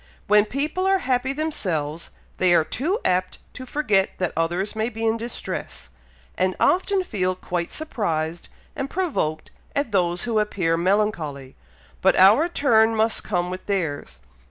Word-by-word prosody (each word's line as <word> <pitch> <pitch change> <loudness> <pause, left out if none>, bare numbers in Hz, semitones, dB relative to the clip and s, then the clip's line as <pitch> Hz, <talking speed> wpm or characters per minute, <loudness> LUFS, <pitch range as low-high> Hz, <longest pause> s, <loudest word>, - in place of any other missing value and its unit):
When 210 0 +5
people 300 - -2
are 385 0 +4
happy 260 -6 0
themselves, 175 - -2 0.3
they 180 -1 +4
are 160 - +4
too 310 - -1
apt 185 0 0 0.2
to 255 - -9
forget 215 -10 +1
that 180 -2 -1
others 175 +6 -1
may 220 +2 0
be 225 -1 -4
in 220 0 +2
distress, 230 +1 -6 0.4
and 185 0 0
often 380 +1 +2
feel 185 - -1
quite 175 -1 -3
surprised 170 - -3 0.3
and 275 -1 -3
provoked 280 - -2 0.2
at 285 -5 -1
those 175 -3 +1
who 230 -3 +1
appear 185 -6 0
melancholy; 170 -8 -1 0.5
but 190 - +4
our 215 - +6
turn 225 -8 +3
must 220 +1 +1
come 180 -3 -1
like 185 0 -7
theirs. 145 - -3
205 Hz, 150 wpm, -23 LUFS, 175-255 Hz, 0.5 s, our